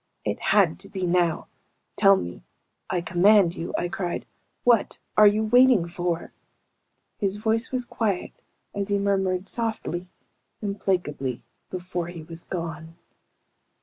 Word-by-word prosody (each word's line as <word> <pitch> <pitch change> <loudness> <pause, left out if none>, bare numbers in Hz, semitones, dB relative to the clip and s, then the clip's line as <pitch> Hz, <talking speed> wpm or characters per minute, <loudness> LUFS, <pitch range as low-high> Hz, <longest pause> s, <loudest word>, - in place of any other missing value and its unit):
It - - -1
had 190 -6 +3
to 200 +1 -8
be 190 -2 -3
now! 175 -2 +1 0.5
"Tell 195 -1 +6
me. 85 - -6 0.5
I 180 -2 0
command 180 +1 +4
you," 165 - -5
I 175 - -1
cried. 175 0 -3 0.4
"What 235 -3 +3 0.2
are 210 0 +8
you 210 +2 +3
waiting 240 -4 +5
for?" 175 -1 -3 0.9
His 200 -2 0
voice 220 +3 0
was 255 -1 -2
quiet 210 -6 -2 0.4
as 200 -1 -2
he 205 -1 +1
murmured, 190 -2 0
softly, 215 -6 -2 0.5
implacably, 180 - -2 0.3
before 180 -2 -4
he 170 -2 -8
was 165 +1 -8
gone. 165 -2 -6
190 Hz, 130 wpm, -25 LUFS, 170-205 Hz, 0.9 s, are